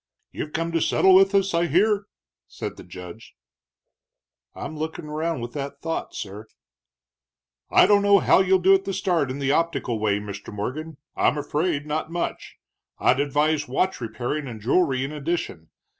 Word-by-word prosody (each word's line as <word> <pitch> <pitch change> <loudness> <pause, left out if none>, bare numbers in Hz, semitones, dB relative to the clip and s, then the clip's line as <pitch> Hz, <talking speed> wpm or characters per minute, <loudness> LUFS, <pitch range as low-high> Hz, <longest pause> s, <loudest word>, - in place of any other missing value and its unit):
"You've 150 - -5
come 165 +1 -1
to 165 -1 0
settle 190 +4 +4
with 195 +1 +6
us, 195 -1 +2
I 170 +1 +2
hear?" 200 +5 +2 0.4
said - - -6
the - - -11
judge. 90 +4 -11 1.2
"I'm 155 - -6
looking 160 +1 -5
around 155 -1 -2
with 120 +1 -6
that 140 0 -5
thought, 165 +2 -4
sir." 105 +1 -7 1.2
"I - - +6
don't 205 -1 +5
know 200 0 +5
how 185 - +4
you'll 190 0 +4
do 190 +1 +5
at 195 0 +2
the 195 - -3
start 170 -8 0
in 130 - -4
the 140 -1 0
optical 145 -8 0
way, 105 -1 +1
Mr. 100 0 -8
Morgan 135 +9 -5 0.2
I'm 150 - +2
afraid 150 0 -1
not 155 +2 -3
much. 175 0 -4 0.4
I'd 130 - +3
advise 150 +2 +1
watch 185 +6 -1
repairing 120 +6 -3
and 115 -3 -7
jewelry 130 - +1
in 140 - -6
addition. 150 - -4
150 Hz, 170 wpm, -24 LUFS, 130-175 Hz, 1.2 s, with